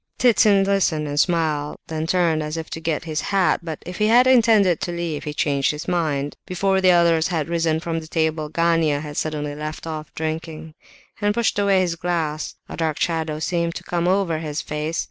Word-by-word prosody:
Ptitsin 210 -5 +4
listened 185 -6 +1
and 145 0 -2
smiled, 155 -4 0
then 160 0 -4
turned 170 -3 +2
as 155 +1 -4
if 160 - -6
to - - -4
get 160 -2 -2
his 155 -2 -3
hat; 195 -2 +1
but 160 -2 -7
if 180 0 -7
he 210 - +3
had 240 +3 +6
intended 225 -8 +4
to 175 - -2
leave, 170 -4 -4
he 150 - -3
changed 140 -2 0
his 150 0 -4
mind. 150 -5 -1
Before 190 +1 +1
the 185 - +5
others 170 -2 +4
had 160 -4 -2
risen 165 -2 0
from 165 0 -3
the 160 - -10
table, 160 -1 -1
Gania 165 -3 +1
had 150 -1 -7
suddenly 150 -2 -2
left 155 +2 -6
off 155 -1 -6
drinking, 160 0 -5 0.5
and 205 0 +1
pushed 235 -3 +1
away 200 -2 +3
his 175 -2 -1
glass, 160 -3 -2
a - - -7
dark 160 -2 -2
shadow 160 -2 -1
seemed 170 +1 -1
to - - -6
come 175 0 -1
over 185 -4 +1
his 155 -1 -4
face. 150 +2 -3
165 Hz, 205 wpm, -22 LUFS, 155-180 Hz, 0.5 s, had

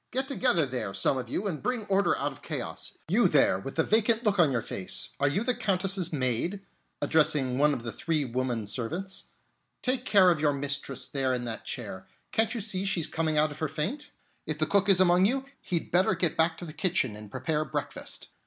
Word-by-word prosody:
"Get 265 +1 -1
together 250 - +2
there, 125 -7 -4
some 115 +7 +2
of 125 -2 -6
you, 195 - -2
and 175 -7 -3
bring 245 -4 -2
order 200 0 +2
out 145 +1 -1
of 135 - -14
chaos. - - -5
You - - +4
there, 95 - +3
with 135 +8 -7
the 160 - +3
vacant 225 +3 +2
look 205 -3 +1
on 160 -5 +5
your 115 -4 -1
face, 95 - -3
are 140 - +3
you 195 +10 -1
the 250 +1 +2
Countess's 190 -4 +1
maid?" 135 - +1 0.4
addressing 140 -5 +2
one 150 +1 +4
of 125 -5 -3
the 115 - -4
three 155 +5 -1
woman 125 -2 -2
servants. 165 - -3 0.6
"Take 255 0 +1
care 195 -7 +5
of 165 - 0
your 150 -2 +3
mistress 140 -1 -2
there 135 -2 0
in 120 -1 -4
that 115 -1 -5
chair. 95 -6 -5 0.2
Can't 225 +2 +1
you 230 - -2
see 195 -2 -2
she's 195 -5 0
coming 160 -1 -1
out 150 0 +3
of 145 - -10
her 155 - 0
faint? 165 - -3 0.4
If 155 -1 -2
the 155 - +1
cook 200 +4 +2
is 190 -2 +6
among 185 +1 +5
you, 270 +3 -1 0.2
he'd 170 -2 -3
better 180 +2 +3
get 170 -4 0
back 165 0 +2
to 175 - -6
the 155 - -8
kitchen 155 - 0
and 105 0 -10
prepare 155 +6 -1
breakfast. - - -5
160 Hz, 220 wpm, -28 LUFS, 135-195 Hz, 0.6 s, is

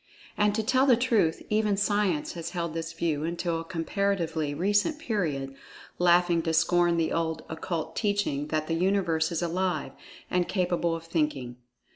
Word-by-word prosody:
And, 210 0 +2
to 220 - 0
tell 260 +4 +3
the 250 -3 +6
truth, 225 -10 +1
even 210 -2 +2
Science 200 -6 +1
has 170 -1 -5
held 170 -2 -2
this 165 0 -4
view 155 -3 -1
until 170 0 -2
a - - -7
comparatively 165 -2 -1
recent 205 - +1
period, 160 - -2 0.5
laughing 175 -1 +4
to 165 0 -1
scorn 175 +1 +3
the 165 -1 +1
old 165 -1 -1
Occult 160 0 -4
Teaching 205 -9 0
that 155 0 -1
the 165 - -2
Universe 170 -2 +1
is 170 0 -1
Alive, 175 -4 -1 0.4
and 180 -1 0
capable 175 -3 0
of 165 - -7
Thinking. 150 -7 -2
170 Hz, 160 wpm, -27 LUFS, 160-200 Hz, 0.5 s, the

